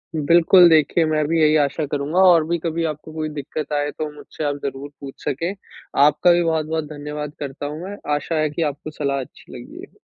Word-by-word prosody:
बिल्कुल, 170 +4 +6
देखिए 160 +1 +3
मैं 155 -1 +1
भी 165 +1 +1
यही 155 0 +4
आशा 145 +2 -2
करूँगा 145 +5 -1
और 165 -2 +4
भी 170 - 0
कभी 165 0 -2
आपको 155 0 -5
कोई 155 -1 -3
दिक्कत 150 +1 -6
आएँ 145 0 0
तो 155 -1 -5
मुझसे 150 - -8
आप 145 -1 0
ज़रूर 140 +1 -5
पूछ 135 -1 -10
सकें। 165 +7 -2 0.5
आपका 150 +4 +4
भी 175 0 +3
बहुत-बहुत 160 -1 -1
धन्यवाद 150 0 -6
करता 140 0 -6
हूँ 150 +2 -5
मैं, 200 +2 -6 0.2
आशा 150 +3 -3
है 155 -1 +1
कि 160 +3 -5
आपको 150 +2 -10
सलाह 140 -2 -2
अच्छी 130 - -13
लगी - - -11
है। - - -35
155 Hz, 210 wpm, -21 LUFS, 145-165 Hz, 0.5 s, बिल्कुल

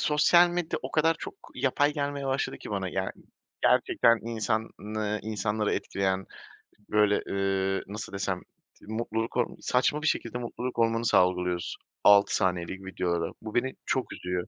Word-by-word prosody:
sosyal 170 +4 +5
medya 175 -1 -2
o - - -5
kadar 160 +1 +3
çok - - -7 0.2
yapay 145 +2 +2
gelmeye 140 -2 -2
başladı 135 0 -1
ki - - -9
bana, 95 -2 -2
yani, 95 +1 -2 0.5
gerçekten 115 0 +4
insanı 110 -1 -2
insanları 105 0 -1
etkileyen, 95 -1 -1 0.6
böyle, 105 -1 +3
ııı, 95 0 0
nasıl 105 +1 -7
desem, 95 -2 -2 0.4
tı - - -17
mutluluk 115 +1 -2
hor 120 - +2
saçma 130 +4 +1
bir 160 - 0
şekilde 120 -2 0
mutluluk 125 +1 -5
hormonu 115 0 +2
salgılıyoruz 90 -2 +2 0.3
6 100 0 +6
saniyelik 95 0 -1
videolara. 85 -3 -1
Bu 110 +1 -7
beni 130 +2 +1
çok 130 - -1
üzüyor. 90 0 -3
110 Hz, 145 wpm, -28 LUFS, 95-125 Hz, 0.6 s, 6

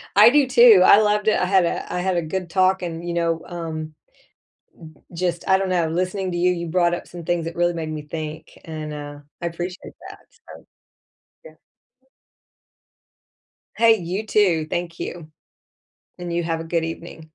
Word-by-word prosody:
I 210 +3 +9
do 285 0 +3
too. 235 -7 +7
I 205 - +8
loved 210 0 +1
it. 215 - +3
I 180 - +1
had 185 -2 +3
a - - -3
I 180 - -1
had 180 -1 0
a - - +1
good 175 +2 -4
talk 190 0 +2
and, 170 0 -5
you 170 - -2
know, 165 -1 0
um, 160 -3 -6 1.0
u 155 - -25
just, 175 -1 -2
I 190 - +6
don't 190 -1 -2
know, 175 -3 +1
listening 185 +2 -2
to 175 - -3
you, 180 +1 +2
you 170 -1 -4
brought 175 0 +1
up - - -5
some 175 -1 -10
things 175 -2 -1
that 165 - -6
really 175 0 +1
made 160 -2 -5
me 155 -1 -5
think, 155 +1 -7
and, 155 -2 -6
uh, 145 0 -8 0.2
I 170 - -1
appreciate 175 +3 -7 0.2
that, - - -12
so, - - -16 0.8
yeah. - - -11 2.2
Hey, 225 -1 +5
you 185 +4 -4
too, 180 -8 +2
thank 175 -1 -4
you. 160 -3 -7 0.9
And 175 -1 -5
you 175 - 0
have 165 -1 -2
a - - -6
good 165 0 -1
evening. 165 0 -7
175 Hz, 185 wpm, -22 LUFS, 165-185 Hz, 2.2 s, I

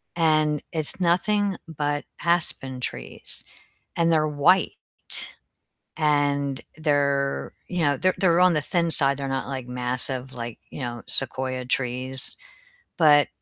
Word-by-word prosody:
and 155 -3 +2
it's 160 +3 -1
nothing 195 +3 +1
but 145 -2 -3 0.2
aspen 150 -6 +3
trees, - - -1 0.5
and 170 -1 +2
they're 155 -1 +2
white, 150 +6 0 0.6
and 145 -3 0 0.2
they're, 140 -3 0 0.2
you 180 -1 -3
know 145 -3 +2
they're 185 +4 +1
they're 175 -2 +3
on 180 -1 +5
the 150 - +1
thin 170 +1 0
side, 140 -3 +3
they're 140 - -4
not, 135 0 -3
like, 130 -2 -5
massive 125 +1 +1
like, 120 -1 -7
you - - -9
know, 120 -2 -5
sequoia 130 -1 -1
trees, 130 +1 +1 0.6
but 150 -4 +5
145 Hz, 130 wpm, -24 LUFS, 130-165 Hz, 0.6 s, on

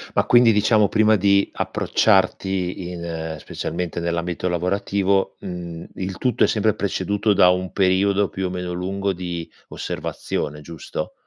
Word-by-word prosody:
Ma - - +3
quindi 120 -1 +6
diciamo 105 0 +4
prima 110 +1 +4
di 100 0 +3
approcciarti 95 -3 +1
in 80 -2 -5
specialmente 85 +3 -4
nell'ambito 85 +1 -2
lavorativo, 95 +2 0
mhmm, 85 -2 -6
il 95 0 -4
tutto 125 -4 +1
è - - +5
sempre 110 -1 +2
preceduto 100 +1 0
da 90 -2 +6
un 90 0 0
periodo 100 +1 +2
più 95 -1 -3
o - - -4
meno 90 -1 -4
lungo 95 +2 -2
di 85 -2 -5 0.2
osservazione, 75 0 -4
giusto? 85 +1 -6
95 Hz, 140 wpm, -22 LUFS, 90-100 Hz, 0.2 s, quindi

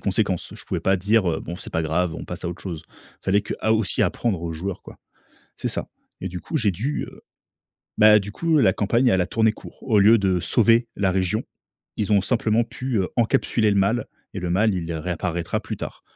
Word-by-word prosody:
conséquences. - - -1
Je - - -10
pouvais - - -3
pas 95 0 +2
dire, 100 0 +2
heu: 80 - -2
«Bon, 85 - -6
c'est 100 - -8
pas 80 - -1
grave, 80 +1 0
on - - -6
passe 90 0 -7
à - - -1
autre 85 - -7
chose». 80 -4 -6
Il - - -23
fallait 100 +2 +2
que - - -5
à 110 - +2
aussi 110 -4 +1
apprendre 105 -8 0
aux 85 -1 -3
joueurs, 90 +4 -5
quoi. - - -13 0.6
C'est - - -3
ça - - -3 0.3
et 95 - -3
du 90 0 -6
coup, 160 - -4
j'ai 105 -7 +2
dû, 120 - -2
heu - - -14 0.8
bah, 105 0 +8
du 100 +1 -7
coup, 165 +2 +1
la 95 -8 +5
campagne, 115 +6 +2
elle 95 -4 +3
a 90 - -2
tourné 110 +1 +2
court. - - -13
Au 110 -5 +2
lieu 110 +4 +7
de 95 -3 +1
sauver 115 +3 +3
la 95 -2 +1
région, 95 +5 0 0.5
ils 105 0 -1
ont 100 - +5
simplement 115 +1 +1
pu, 125 +1 -4
heu, 95 - 0
encapsuler 115 -2 +2
le 100 - +1
mal 100 +5 +1 0.3
et 95 - -4
le 90 - -3
mal, 105 +5 +3
il, 85 -2 -3
heu, 80 - -3
réapparaîtra 85 +1 -2
plus - - -6
tard. - - -7
100 Hz, 235 wpm, -23 LUFS, 90-110 Hz, 0.8 s, bah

